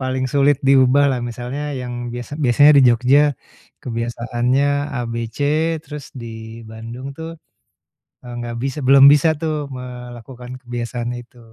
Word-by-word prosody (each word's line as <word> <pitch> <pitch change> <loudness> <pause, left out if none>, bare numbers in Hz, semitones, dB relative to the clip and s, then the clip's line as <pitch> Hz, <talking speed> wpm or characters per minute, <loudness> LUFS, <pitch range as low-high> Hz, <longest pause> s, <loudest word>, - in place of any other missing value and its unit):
paling 130 0 -2
sulit 140 0 +3
diubah 135 +1 +5
lah, 130 -2 -1
misalnya 125 +5 -6 0.2
yang 125 -1 -6 0.2
biasa 120 +2 -7
biasanya 145 +4 +6
di - - +6
Jogja 125 +4 +4 0.6
kebiasaannya 120 +2 -1 0.3
A, - - -2
B, - - -5 0.2
C, - - -11 0.4
terus 150 -2 -9 0.2
di 115 0 -9
Bandung 115 +4 -8
tuh, 160 0 -7 0.9
eee, 120 -1 -9
nggak 120 -1 -5
bisa 135 +2 -3
belum 135 +1 +7
bisa 150 +2 +4
tuh 160 -1 -1 0.2
melakukan 125 0 -9
kebiasaan 120 0 -4
itu? 120 0 -14
125 Hz, 140 wpm, -19 LUFS, 120-135 Hz, 0.9 s, belum